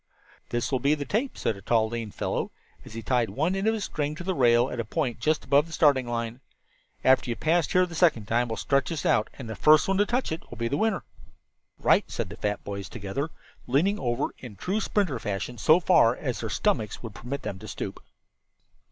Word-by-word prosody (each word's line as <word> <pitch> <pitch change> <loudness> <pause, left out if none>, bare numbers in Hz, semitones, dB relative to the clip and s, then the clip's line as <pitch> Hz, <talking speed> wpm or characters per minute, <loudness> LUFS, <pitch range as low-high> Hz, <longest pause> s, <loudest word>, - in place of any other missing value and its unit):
"This 120 +3 -1
will 130 - +1
be 140 +4 +3
the 145 -1 -5
tape," 230 - -1
said 110 - -1
a 100 - -11
tall 110 +2 +2
lean 115 -1 -4
fellow, - - -2 0.3
as 110 - -12
he 115 - -5
tied 120 0 +1
one 160 +8 0
end 195 +2 -1
of 220 - +3
a 220 - -4
string 150 -5 -2
to 175 - -7
the 190 +1 -1
rail, 120 -4 +4
at 125 - -4
a - - 0
point 125 +1 -2
just 155 0 0
above 140 +4 +4
the - - -13
starting 140 -6 +3
line. 115 0 -3 0.6
"After 130 -1 +4
you 120 - -1
have - - -18
passed 165 0 +1
here 185 0 +5
the 175 - -10
second 155 - +3
time 120 +2 +1
we'll 110 - -4
stretch 140 -1 +1
this 160 -4 -4
out, 110 -1 +2
and 130 - -8
the 110 - -5
first 150 +7 +5
one 195 0 +1
to 205 - +3
touch 250 -4 0
it 160 - -3
will 120 - -9
be 115 +1 -1
the 140 - -1
winner." 215 +4 0 0.7
"Right," - - +3
said - - -3
the - - -9
fat 105 0 -2
boys 100 -1 -6
together, 120 +8 -4 0.4
leaning 170 +12 +2
over 120 +2 -1
in 120 -5 -9
true 190 - -2
sprinter 185 - 0
fashion 105 +4 -4
so 155 - +5
far 160 -10 +4
as 130 -4 -3
their 110 - -3
stomachs 115 - -1
would 115 -3 -7
permit 140 +7 -6
them 95 - -5
to 110 - -10
stoop. - - -6
130 Hz, 235 wpm, -27 LUFS, 115-165 Hz, 0.7 s, here